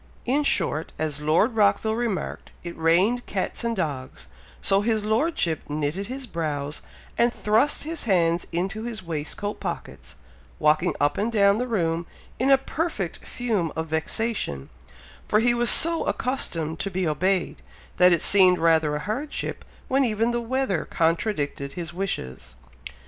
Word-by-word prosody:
In 270 +5 +2
short, 165 - 0
as 150 -2 -2
Lord 160 +11 +3
Rockville 220 +1 +3
remarked, 230 -5 -3
"it 170 -1 -6
rained 185 +10 +2
cats 195 +4 -3
and 230 -1 -1
dogs," 145 -9 -4 0.3
so 195 0 +2
his 215 -1 0
Lordship 220 - +1
knitted 155 +6 -2
his 265 +1 -5
brows, 150 -7 -3 0.4
and 235 0 +4
thrust 225 +6 +1
his 320 -1 -4
hands 170 -4 +2
into 190 +5 -2
his 225 -4 -5
waistcoat 165 +5 -4
pockets, - - -6 0.4
walking 155 0 +2
up 145 +1 +1
and 220 +3 0
down 200 -1 +4
the 250 - -1
room 170 -7 -1 0.3
in 260 +3 +2
a 270 - +7
perfect 270 - -3
fume 215 -10 -2
of 160 0 -3
vexation, 160 - -2 0.6
for 215 - +3
he 240 +2 +3
was 240 0 +2
so 335 0 +5
accustomed 165 - -2
to 195 - -2
be 185 -2 -1
obeyed, 185 +5 0 0.4
that 180 0 +6
it 170 - +2
seemed 185 -2 +5
rather 160 -3 +3
a - - -2
hardship 225 - -4 0.2
when 270 +1 +2
even 225 -1 +1
the 240 0 -1
weather 235 -7 -1
contradicted 160 -5 -1
his 170 -1 -5
wishes. 65 - -4
195 Hz, 150 wpm, -25 LUFS, 160-235 Hz, 0.6 s, a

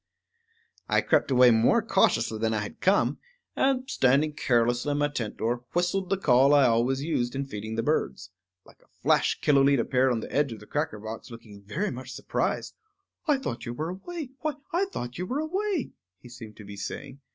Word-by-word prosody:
I - - +3
crept - - +2
away 125 -2 +6
more 120 - +3
cautiously 115 - +2
than 110 0 0
I 105 - 0
had 105 - -8
come, 195 +2 +2 0.4
and, 265 -1 +1
standing 145 - +2
carelessly 120 0 +1
in - - -1
my 145 0 +1
tent 120 -7 -4
door, 120 +2 -1
whistled 180 +2 0
the 195 - +1
call 135 -4 +5
I 140 -2 +6
always 125 +3 +2
used 125 -6 -1
in 140 +1 -2
feeding 110 -3 -6
the 115 - -1
birds. 105 -9 -1 0.3
Like - - -20
a - - -27 0.2
flash - - +2
Killooleet 140 -1 +4
appeared 130 +2 +2
on 115 -2 -1
the - - -8
edge 145 -3 +1
of 110 - -10
the 105 - -13
cracker 150 -2 -2
box, 110 +4 -8
looking 110 -4 -12
very 165 - -3
much 130 +1 -8
surprised. - - -2 0.5
"I 295 -2 +4
thought 130 - -5
you 120 - -4
were 155 +5 -3
away; 285 - -6
why, 310 -1 -1 0.2
I 365 +3 +2
thought 125 - -6
you 180 - -3
were 260 - -2
away," 370 - -2 0.3
he 120 +6 -15
seemed 115 -3 -11
to 105 - -10
be 100 0 -9
saying. 135 +7 -6
130 Hz, 200 wpm, -27 LUFS, 115-180 Hz, 0.5 s, away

